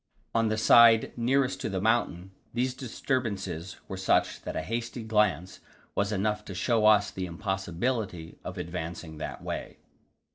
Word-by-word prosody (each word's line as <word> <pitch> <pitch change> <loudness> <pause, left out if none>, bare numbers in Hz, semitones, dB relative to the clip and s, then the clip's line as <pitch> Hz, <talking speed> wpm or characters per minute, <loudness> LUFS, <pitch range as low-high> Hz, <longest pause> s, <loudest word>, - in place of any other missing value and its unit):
On 115 0 +2
the 110 - 0
side 115 0 +7
nearest 130 +2 +1
to - - -2
the 95 -2 -2
mountain 95 -4 0 0.2
these 125 +1 +1
disturbances 105 - -3
were 95 - -5
such 95 - +1
that - - -6
a 80 - -2
hasty 115 +3 -4
glance 105 -6 +1 0.3
was 100 +1 0
enough 105 +1 0
to 95 - -7
show 110 +3 +2
us 105 -1 +5
the 95 -1 -4
impossibility 95 0 -3
of - - -6
advancing 85 -2 -5
that - - -6
way. - - -5
105 Hz, 150 wpm, -28 LUFS, 90-115 Hz, 0.3 s, side